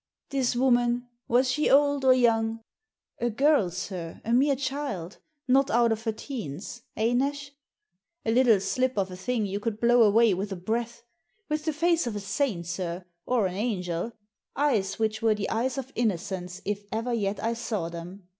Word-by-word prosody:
This 260 -3 +1
woman, 245 -1 +2 0.2
was 250 +2 +3
she 300 +3 +1
old 285 0 +4
or 260 -1 +7
young? 225 -2 +2 0.2
" 440 - -60
*' - - -40
A 240 - +1
girl, 270 - +3
sir, 175 -1 -6
a 230 - 0
mere 275 +3 +4
child, 265 - -4 0.3
not 270 +2 +4
out 235 0 +3
of 225 +1 -2
her 225 - +1
teens 220 - -7
— - - -33
eh, 225 +2 +2
Nash? 280 +3 -1 0.7
A 225 - +2
little 235 -3 +5
slip 255 +4 0
of 190 -2 0
a - - -6
thing 220 +4 -1
you 200 +1 -3
could 215 0 -3
blow 240 +1 +5
away 220 0 +5
with 195 +3 -3
a - - -2
breath. 230 +5 -3 0.5
With 305 0 -2
the 315 - +1
face 335 -1 +2
of 225 - -3
a - - -2
saint, 200 -2 -1
sir, 175 0 -4 0.2
or 245 -5 +2
an 185 - -2
angel, 185 -2 -2 0.4
eyes 215 -10 +1
which 220 0 -1
were 225 -1 +3
the 205 -1 -3
eyes 245 +4 0
of 270 0 -5
innocence, 185 -4 -2
if 205 0 -2
ever 230 +3 -2
yet 205 -3 -1
I 230 +1 0
saw 215 -6 -3
them. 175 +3 -9
230 Hz, 190 wpm, -27 LUFS, 195-255 Hz, 0.7 s, or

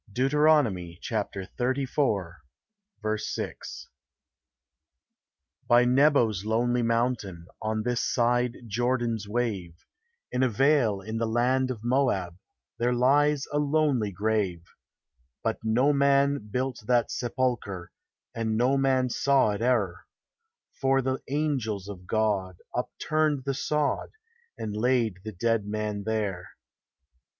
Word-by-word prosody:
DEUTERONOMY 130 - +2
xxxiv. 110 - -3
6. - - -5 1.8
By 120 +1 +5
Nebo's 125 -6 +3
lonely 120 +3 +1
mountain, 115 -7 -1 0.2
On 110 0 -1
this 120 0 0
side 120 0 +1
Jordan's 120 -1 -1
wave, 100 -7 -3 0.5
In 125 - 0
a 130 - +3
vale 120 -4 +2
in 110 +3 -4
the 115 - 0
land 125 +3 +1
of 115 -4 -5
Moab, 120 -9 +1 0.4
There 120 +1 +1
lies 145 +3 +3
a 145 - +2
lonely 145 -7 +1
grave; 100 -3 -1 0.8
But - - -1
no 125 +6 +3
man 140 -3 +2
built 130 +3 -2
that 120 -2 +2
sepulchre, 120 -7 -2 0.4
And 110 -1 -1
no 130 +4 +3
man 130 -1 +2
saw 135 -5 +3
it 100 +1 -4
e'er; 105 -7 0 0.7
For 135 0 +1
the 130 +1 -1
angels 130 -9 -1
of 90 -3 -9
God 100 -5 0 0.2
upturned 155 -3 0
the 140 +1 -1
sod, 150 +2 -1 0.5
And 105 -2 -4
laid 115 -4 +1
the 110 - -5
dead 110 +2 0
man 105 -1 -3
there. 100 -5 -2
120 Hz, 110 wpm, -27 LUFS, 105-135 Hz, 1.8 s, By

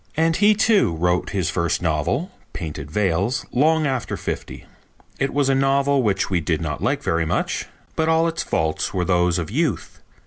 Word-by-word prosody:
And 165 0 +2
he, 210 +2 +5
too, 205 - +3
wrote 90 +2 0
his 95 -4 -1
first 85 -1 0
novel, 85 - -1 0.2
Painted 75 -4 -6
Veils, 100 - 0
long 155 +4 +3
after 130 -4 -2
fifty. - - -6 0.5
It 135 - 0
was 145 -1 +1
a 135 - +3
novel 135 +1 +2
which 100 -5 +1
we 90 -3 0
did 75 - -1
not - - -4
like - - 0
very 80 0 +1
much, - - -1 0.3
but 160 0 +1
all 160 +1 +3
its 165 0 -2
faults 80 +3 -1
were 90 -1 0
those 90 0 +2
of 85 +1 -4
youth. 150 0 -2
110 Hz, 180 wpm, -22 LUFS, -, 0.5 s, he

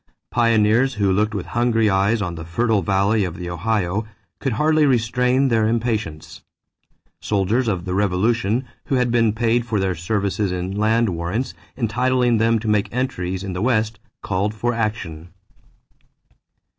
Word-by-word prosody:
Pioneers 115 +2 +3
who 100 -2 +1
looked 105 +2 0
with 100 - -3
hungry 120 -2 +1
eyes 100 +3 +2
on 90 -2 -3
the 80 -1 -7
fertile 110 +6 +1
valley 100 +4 +2
of 90 -3 -4
the 90 -1 -5
Ohio 100 +2 -1 0.3
could 135 - -1
hardly 155 +4 +3
restrain 125 +2 +2
their 110 -2 +2
impatience. 110 -9 -2 0.8
Soldiers 105 +5 0
of 95 -5 -1
the 90 - -3
Revolution, 105 +5 +1 0.2
who 140 - 0
had 125 -2 +1
been 115 -2 +3
paid 115 +2 +1
for 110 -3 -1
their 95 -1 0
services 100 +3 -1
in 90 +1 -3
land 110 +2 +2
warrants 90 +9 -3 0.2
entitling 125 0 +1
them 115 +1 +3
to 110 0 -5
make 105 -1 +1
entries 95 -7 -2
in 95 -1 -4
the 90 - -3
West, 110 -2 0 0.2
called 100 +3 -1
for 120 +3 -1
action. 95 -8 -4
110 Hz, 155 wpm, -21 LUFS, 95-120 Hz, 0.8 s, Pioneers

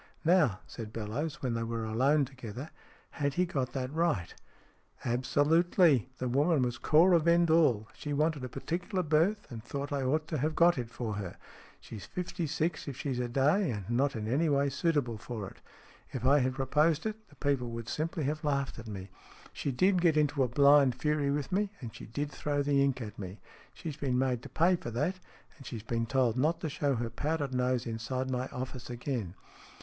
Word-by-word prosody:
"Now," 155 - +4
said 110 -3 -8
Bellowes, 130 +10 -4
when 125 -3 0
they 115 - -1
were 115 0 -3
alone 135 +7 +3
together. 130 +1 -8 0.2
" - - -30
Had 140 -1 +1
he 180 - +3
got 130 -7 -2
that 130 0 -3
right? 160 - 0 0.4
" - - -23
"Absolutely. 145 - +3
The 130 - -2
woman 145 +3 +3
was 120 -1 -2
Cora 170 +3 +5
Vendall. 160 -9 +3
She 150 - -6
wanted 150 -1 +1
a 125 - -4
particular 180 - -2
berth, 165 +7 +2
and 115 -2 -7
thought 140 +4 -5
I 140 - 0
ought 150 +4 0
to 155 - -1
have 155 +3 0
got 170 -4 +5
it 120 -2 -4
for 115 -2 -4
her. 95 -4 -6 0.4
She's 105 -4 -9
fifty 180 -2 -3
six 160 +2 -1
if 135 -3 -5
she's 135 -4 -2
a 125 - -1
day, 145 +9 +2
and 105 -5 -4
not 135 +3 +1
in 110 -1 -3
any 150 +8 +2
way 140 0 +2
suitable 140 -6 0
for 110 -3 -5
it. - - -13 0.5
If 130 -1 -4
I 140 +3 +6
had 130 0 0
proposed 150 - +2
it, 220 0 -5
the - - -19
people 140 -5 0
would 115 -1 -6
simply 160 +4 -2
have 150 +2 -2
laughed 140 -4 -1
at 115 - -9
me. 95 -2 -7 0.4
She 140 - -2
did 185 +7 +3
get 165 -3 +4
into 145 -1 +2
a 130 - +4
blind 140 +1 +5
fury 150 +1 0
with 145 +3 -1
me, 200 +2 0
and 115 -5 -7
she - - -10
did 145 +6 -3
throw 145 0 -1
the 140 -1 +3
ink 135 -2 0
at 105 -2 -7
me. 95 +1 -7 0.4
She's 155 -4 -6
been 135 -4 0
made 125 -2 +1
to - - -10
pay 175 +3 +3
for 120 - -6
that, 150 +11 -1 0.4
and 135 - -13
she's 110 -3 -6
been 115 0 -1
told 125 -2 +2
not 160 +5 +2
to 160 - -2
show 140 -1 0
her 115 0 -3
powdered 145 -3 -2
nose 125 -1 +1
inside 125 +3 -3
my 125 0 -1
office 125 -1 -6
again. 120 -6 -3
140 Hz, 205 wpm, -31 LUFS, 120-155 Hz, 0.5 s, I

